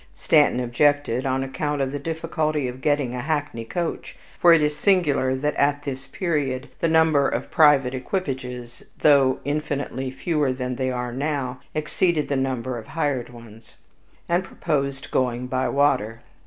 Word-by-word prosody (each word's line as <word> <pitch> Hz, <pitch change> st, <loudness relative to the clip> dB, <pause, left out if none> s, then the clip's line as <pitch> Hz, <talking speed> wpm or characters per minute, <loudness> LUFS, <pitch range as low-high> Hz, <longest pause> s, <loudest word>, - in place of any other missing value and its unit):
Stanton 150 Hz, -5 st, +3 dB
objected, 130 Hz, +1 st, +1 dB
on 130 Hz, 0 st, 0 dB
account 145 Hz, +2 st, -3 dB
of 135 Hz, -1 st, 0 dB
the 145 Hz, -, -4 dB
difficulty 155 Hz, -2 st, -2 dB
of 125 Hz, +1 st, -7 dB
getting 145 Hz, -4 st, +1 dB
a 125 Hz, -, -3 dB
hackney 145 Hz, -5 st, -2 dB
coach 170 Hz, +8 st, -4 dB, 0.2 s
(for 175 Hz, -, +6 dB
it 165 Hz, -2 st, +6 dB
is 150 Hz, 0 st, 0 dB
singular 150 Hz, -9 st, +2 dB
that 150 Hz, +3 st, -1 dB
at 145 Hz, 0 st, +1 dB
this 135 Hz, -1 st, -5 dB
period 145 Hz, -8 st, -2 dB
the 165 Hz, -, +1 dB
number 160 Hz, -3 st, +4 dB
of -, -, -4 dB
private 145 Hz, -5 st, +5 dB
equipages, 130 Hz, -5 st, -4 dB, 0.2 s
though 140 Hz, -3 st, +5 dB
infinitely 145 Hz, -3 st, -2 dB
fewer 145 Hz, +1 st, 0 dB
than 125 Hz, -1 st, -3 dB
they 130 Hz, -1 st, -1 dB
are 125 Hz, -1 st, -3 dB
now, 135 Hz, -2 st, -2 dB, 0.2 s
exceeded 155 Hz, +1 st, 0 dB
the 140 Hz, -, +1 dB
number 130 Hz, -2 st, -2 dB
of 110 Hz, -, -12 dB
hired 145 Hz, -7 st, -2 dB
ones), 115 Hz, -2 st, -14 dB, 0.5 s
and 175 Hz, +2 st, +1 dB
proposed 140 Hz, -5 st, -3 dB
going 125 Hz, -1 st, 0 dB
by 130 Hz, 0 st, -1 dB
water. 115 Hz, -5 st, +1 dB
140 Hz, 155 wpm, -23 LUFS, 130-150 Hz, 0.5 s, for